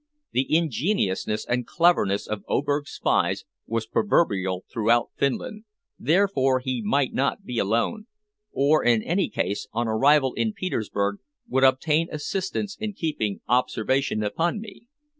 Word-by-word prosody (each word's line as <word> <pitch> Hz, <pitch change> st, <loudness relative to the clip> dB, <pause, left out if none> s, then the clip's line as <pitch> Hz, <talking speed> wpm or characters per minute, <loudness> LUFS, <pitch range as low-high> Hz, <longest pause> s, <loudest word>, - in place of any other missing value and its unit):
The 130 Hz, +1 st, 0 dB
ingeniousness 130 Hz, -, -1 dB
and 120 Hz, -1 st, -1 dB
cleverness 165 Hz, -, +2 dB
of 105 Hz, -1 st, -5 dB
Oberg's 145 Hz, +1 st, 0 dB
spies -, -, 0 dB, 0.2 s
was 115 Hz, 0 st, -2 dB
proverbial 95 Hz, -, +1 dB
throughout 115 Hz, 0 st, +1 dB
Finland, 210 Hz, -, -2 dB, 0.3 s
therefore 145 Hz, -4 st, +2 dB
he 125 Hz, -1 st, -3 dB
might 135 Hz, +5 st, +1 dB
not 140 Hz, +9 st, 0 dB
be 120 Hz, -2 st, -3 dB
alone, 115 Hz, -, 0 dB, 0.4 s
or 145 Hz, +3 st, +3 dB
in 115 Hz, -3 st, +3 dB
any 180 Hz, +3 st, 0 dB
case, 100 Hz, -, -2 dB
on 120 Hz, +1 st, -1 dB
arrival 135 Hz, +4 st, +3 dB
in 220 Hz, -1 st, -1 dB
Petersburg 105 Hz, -, -2 dB, 0.3 s
would 130 Hz, +1 st, +1 dB
obtain 150 Hz, +5 st, +3 dB
assistance 195 Hz, +6 st, -3 dB
in 215 Hz, -1 st, -3 dB
keeping 145 Hz, -, -2 dB
observation 125 Hz, -1 st, +1 dB
upon 165 Hz, -, -1 dB
me. 220 Hz, +2 st, -11 dB
135 Hz, 130 wpm, -25 LUFS, 110-170 Hz, 0.4 s, or